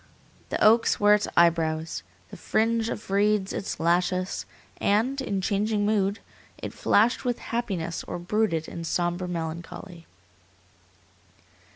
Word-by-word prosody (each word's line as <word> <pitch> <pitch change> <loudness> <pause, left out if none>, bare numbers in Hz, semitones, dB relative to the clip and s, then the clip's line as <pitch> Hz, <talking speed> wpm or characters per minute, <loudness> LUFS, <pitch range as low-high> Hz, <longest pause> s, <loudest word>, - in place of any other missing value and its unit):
The - - -2
oaks 225 +2 +5
were 205 0 +6
its 210 0 +2
eyebrows, 165 -1 +2 0.3
the - - -10
fringe 225 +1 0
of 210 - -6
reeds 200 -1 +2
its 195 - -4
lashes, 180 +2 0 0.3
and, 235 +7 +1
in 200 -7 -2
changing 205 +2 0
mood, 205 -1 +1 0.4
it - - -6
flashed 225 +6 +2
with 245 -2 0
happiness 190 -8 -3
or - - -5
brooded 175 -3 0
in 170 - -6
sombre 175 +2 -1
melancholy. 170 +1 -6
195 Hz, 120 wpm, -26 LUFS, 170-215 Hz, 0.4 s, were